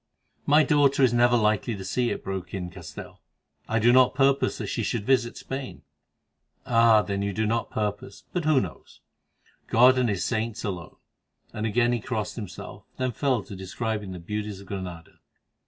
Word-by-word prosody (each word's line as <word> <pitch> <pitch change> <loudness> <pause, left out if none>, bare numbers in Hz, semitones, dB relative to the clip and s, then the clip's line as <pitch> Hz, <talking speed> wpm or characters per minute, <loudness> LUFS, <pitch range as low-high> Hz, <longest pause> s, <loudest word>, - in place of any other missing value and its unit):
"My 150 +2 +6
daughter 140 -2 +3
is 125 -2 +4
never 120 0 +4
likely 110 +1 +1
to 95 -1 -8
see 125 +3 0
it," - - -4
broke 95 -1 -5
in 90 -2 -5
Castell; - - -10 0.5
"I 110 - +1
do 120 +2 +4
not 130 0 +5
purpose 135 0 +2
that - - -4
she - - -2
should 110 -3 -2
visit 125 -2 +1
Spain." 135 -1 -6 0.8
"Ah! 115 -2 +5
you 100 0 -1
do 110 +3 -1
not 115 +2 -1
purpose; 105 +4 -4
but 180 - -1
who 155 -3 +4
knows? - - -7 0.7
God 125 +3 +5
and 125 -2 +2
His 95 -4 -1
saints 115 0 -2
alone," 90 -6 -5 0.6
and 110 +1 -2
again 120 +2 +2
he 120 - 0
crossed 110 -2 -3
himself, 100 -7 -8
then 130 -1 -1
fell 125 -2 0
to 100 - -9
describing 105 +2 -4
the 90 - -6
beauties 105 +3 -5
of 100 - -12
Granada. 90 -4 -7
110 Hz, 175 wpm, -26 LUFS, 100-125 Hz, 0.8 s, My